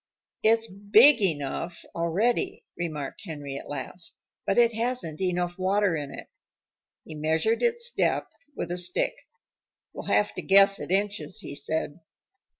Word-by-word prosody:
"It's 225 +1 +4
big 215 +6 +5
enough 160 -1 -2
already," 175 +9 0
remarked 155 -5 -5
Henry 145 -7 -6
at - - -12
last, 155 +5 -6 0.3
"but 195 - +1
it 235 -1 +5
hasn't 225 -9 -2
enough 180 -1 -1
water 195 -1 +2
in 145 -2 -4
it." - - -9 0.8
He 160 - -9
measured 160 +9 +1
its 475 0 +1
depth - - 0 0.2
with 170 - -4
a 175 - -2
stick. 180 - +1 0.8
"We'll - - -8
have 210 - +2
to - - -4
guess 195 0 +5
at - - -6
inches," 195 -5 -1
he - - -7
said. 155 +1 -2
185 Hz, 145 wpm, -27 LUFS, 160-210 Hz, 0.8 s, big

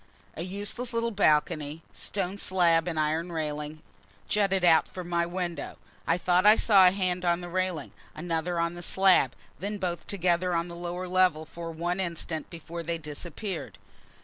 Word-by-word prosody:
A - - -6
useless 205 +7 -3
little 230 0 0
balcony 155 -4 +1
stone 195 0 -3
slab 170 -3 +3
and 165 -3 -1
iron 160 +3 0
railing 150 -1 -4 0.4
jutted 195 -3 +2
out 165 -2 +5
from 180 -2 -8
my 170 0 +1
window. 175 -1 -4 0.3
I 165 - +3
thought 180 0 +2
I 210 +1 +8
saw 195 -5 +6
a - - +6
hand 185 -2 -1
on 175 -1 +2
the 175 - -6
railing, 185 -4 -2 0.2
another 170 +1 -2
on 170 0 0
the 175 - -8
slab, 185 -8 +4 0.2
then 205 +4 -3
both 180 -3 -3
together 180 -2 +1
on 170 +1 -1
the 170 - -7
lower 175 +1 -4
level 180 -4 +2
for 165 +1 -7
one 175 +3 -2
instant 170 -3 -3
before 170 0 -7
they 165 0 -2
disappeared. 165 +5 -6
175 Hz, 170 wpm, -28 LUFS, 165-185 Hz, 0.4 s, I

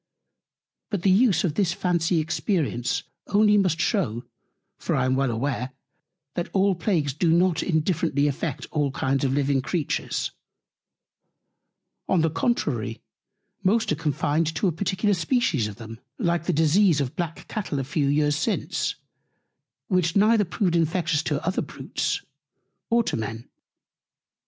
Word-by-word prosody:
But 200 -5 -3
the 195 - +4
Use 205 -2 +4
of 170 -6 0
this 185 -2 +1
Fancy 175 -1 +1
Experience 155 - -1 0.2
only 210 0 +4
must 185 -5 +2
shew; 135 - 0 0.5
for - - -1
I - - +1
am 130 0 +2
well 135 -1 +1
aware, 125 +2 -2 0.6
that 175 - -3
all 195 0 +3
Plagues 165 -6 0
do 160 +3 +1
not 170 -1 +3
indifferently 160 -3 +1
affect 145 0 -3
all 145 -2 +1
Kinds 135 0 -1
of 135 - +1
living 140 -1 +1
Creatures; 155 +2 -2 1.8
on 180 - +3
the 160 -1 +1
contrary, 240 +10 -1 0.6
most 205 +2 +2
are - - +2
confined 155 +1 0
to 190 - +1
a - - +2
particular 195 +4 0
Species 180 - +1
of 105 - -7
them; 115 0 -10 0.2
like 170 - 0
the - - +3
Disease 160 +2 +4
of 140 -3 0
the - - -26
Black 170 -2 -5
Cattle 205 -9 -3
a 135 - -1
few 145 +1 -1
Years 145 +1 +2
since, 200 +8 -1 0.9
which 180 -4 +1
neither 210 +1 +4
proved 180 -1 0
Infectious 165 -1 +1
to 150 -2 -2
other 185 +2 0
Brutes, - - -3 0.7
nor 235 0 +3
to - - -2
Men. 115 +1 -5
165 Hz, 145 wpm, -25 LUFS, 145-190 Hz, 1.8 s, the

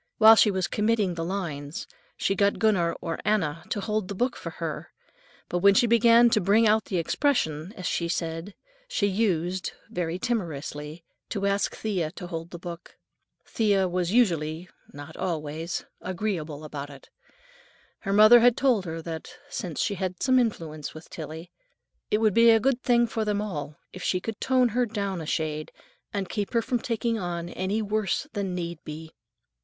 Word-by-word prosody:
While 220 0 +9
she 215 - +5
was 190 -2 0
committing 210 -3 +1
the 165 -1 -3
lines, 165 -5 -4 0.3
she 195 - +1
got 200 +1 +2
Gunner 190 -7 +2
or 165 -2 -3
Anna 170 -7 0
to - - -1
hold 210 -1 -1
the 200 - -5
book 245 +5 0
for - - -6
her, - - -5 0.6
but 175 - -1
when 200 +2 +6
she 240 - +5
began 235 +1 +6
"to 215 - +3
bring 210 +5 +4
out 215 0 +3
the 185 - -2
expression," 165 - 0
as 185 - -6
she 170 - 0
said, 165 +3 -3 0.3
she 355 - 0
used, 185 -3 0 0.2
very 175 -1 -2
timorously, 160 - -4 0.3
to 200 -2 -2
ask 200 0 0
Thea 185 -8 -1
to 185 - -8
hold 165 -1 -6
the 175 - -8
book. 170 0 -9 0.5
Thea 200 -4 +2
was 180 0 -1
usually—not 160 -7 -1
always—agreeable 165 +1 -4
about 145 -2 -6
it. 140 -2 -14 0.9
Her 195 - -3
mother 215 +4 +8
had 240 0 +5
told 245 -8 +2
her 165 -1 -5
that, 160 -1 -6 0.2
since 170 -5 -4
she 205 - +1
had 185 -1 -3
some 255 0 +4
influence 160 - -3
with 155 - -12
Tillie, 160 +2 -7 0.6
it 210 - +3
would 215 -2 +2
be 230 +2 +6
a 225 -1 +6
good 255 +2 +1
thing 240 -1 +4
for 225 -1 -2
them 210 -1 0
all 155 -8 -4 0.2
if 185 - -8
she 180 - +1
could 220 +4 -6
tone 255 -2 +3
her 245 +2 +1
down 200 -5 -3
a 155 - -7
shade 155 -1 -2 0.4
and 200 -2 -2
"keep 205 +3 -3
her 230 -1 +2
from 245 +1 0
taking 230 -1 -1
on 175 -2 -4
any 195 +5 -1
worse 215 - -1
than 195 -4 -2
need 170 -2 -5
be." 160 +1 -8
190 Hz, 175 wpm, -26 LUFS, 165-215 Hz, 0.9 s, While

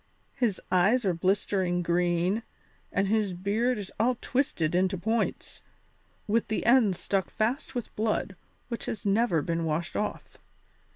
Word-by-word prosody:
His 240 -8 0
eyes 205 +7 +3
are 185 - +2
blistering 185 0 0
green 175 +4 +1 0.5
and 195 0 +1
his 210 -3 +1
beard 215 +7 0
is 200 -2 -6
all 245 +2 +2
twisted 210 - 0
into 185 +1 +2
points, 220 +5 -2 0.6
with 220 +2 +1
the 215 - -2
ends 230 -6 +4
stuck 195 -3 -1
fast 245 +4 -2
with 245 - -5
blood, 215 -2 -1 0.3
which 235 -2 -5
has 215 - -4
never 200 -6 +2
been 165 +1 -1
washed 165 +3 -2
off. 210 - -4
200 Hz, 140 wpm, -28 LUFS, 180-225 Hz, 0.6 s, ends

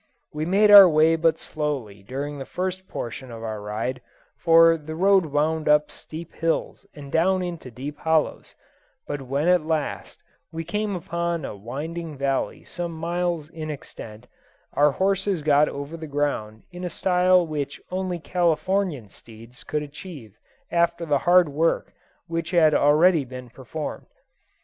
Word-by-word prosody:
We 155 +1 -3
made 205 +3 +4
our 200 -3 +11
way 160 +1 +4
but 165 -1 +2
slowly 135 -13 -4
during 140 +7 -5
the - - -4
first 185 +1 -4
portion 125 +2 -6
of 115 -1 -8
our 110 -2 -4
ride, 110 +5 -4 0.3
for 165 0 +6
the 155 0 -7
road 190 0 +4
wound 155 +2 0
up 150 0 +4
steep 165 +1 -10
hills 165 0 -2
and 140 -2 -10
down 185 +3 +2
into 170 -7 -6
deep 140 +5 -7
hollows, 160 -1 0 0.5
but 145 -1 -4
when 140 +4 -1
at 180 -2 +4
last 160 -2 -3 0.3
we 165 0 -5
came 205 +4 -2
upon 170 -3 -3
a - - -6
winding 150 - -6
valley 135 0 -1
some 175 -1 -5
miles 170 -1 -2
in 155 -1 -7
extent, 115 -6 -9 0.5
our 145 0 +4
horses 195 -2 0
got 150 0 +4
over 140 +3 -6
the 160 -1 -7
ground 140 -7 -2
in 180 0 -8
a 180 - -2
style 180 0 +3
which 145 -3 -4
only 185 -1 -2
Californian 170 - 0
steeds 115 +4 -15
could 150 -1 -2
achieve 145 - -10 0.4
after 170 0 +1
the 145 -3 +2
hard 180 -1 +6
work 155 +3 0 0.3
which 165 0 -3
had 165 -4 +4
already 155 +3 +4
been 125 -1 -10
performed. 135 +5 -7
155 Hz, 155 wpm, -24 LUFS, 140-175 Hz, 0.5 s, our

